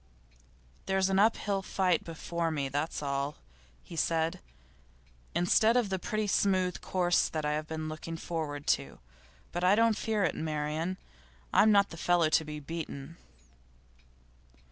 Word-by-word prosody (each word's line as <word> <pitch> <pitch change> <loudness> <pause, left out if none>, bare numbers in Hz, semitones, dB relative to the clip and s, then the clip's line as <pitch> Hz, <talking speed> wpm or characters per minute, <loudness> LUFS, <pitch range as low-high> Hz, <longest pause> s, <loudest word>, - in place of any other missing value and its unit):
'There's 190 0 +2
an 190 - +3
uphill 205 -2 +2
fight 185 -3 +1
before 165 0 -3
me, 145 -4 -1
that's 145 +3 -2
all,' 140 +1 -2 0.5
he - - -10
said, 165 0 0 1.0
'instead 220 +7 +4
of 235 -5 +1
the 190 -1 -1
pretty 215 +3 -2
smooth 185 -3 +1
course 175 -2 +2
I 150 -2 -1
have 155 +1 -2
been 155 0 -4
looking 155 +1 -6
forward 155 -4 -4
to. - - 0 0.5
But 175 - -3
I 185 +3 +5
don't 230 0 +4
fear 215 -2 0
it, - - +1
Marian. 155 +3 -2 0.6
I'm 215 - +6
not 200 -1 +4
the 165 - -8
fellow 175 -1 +3
to 160 0 +3
be 150 -1 -6
beaten. 160 0 -6
170 Hz, 145 wpm, -30 LUFS, 155-190 Hz, 1.0 s, I'm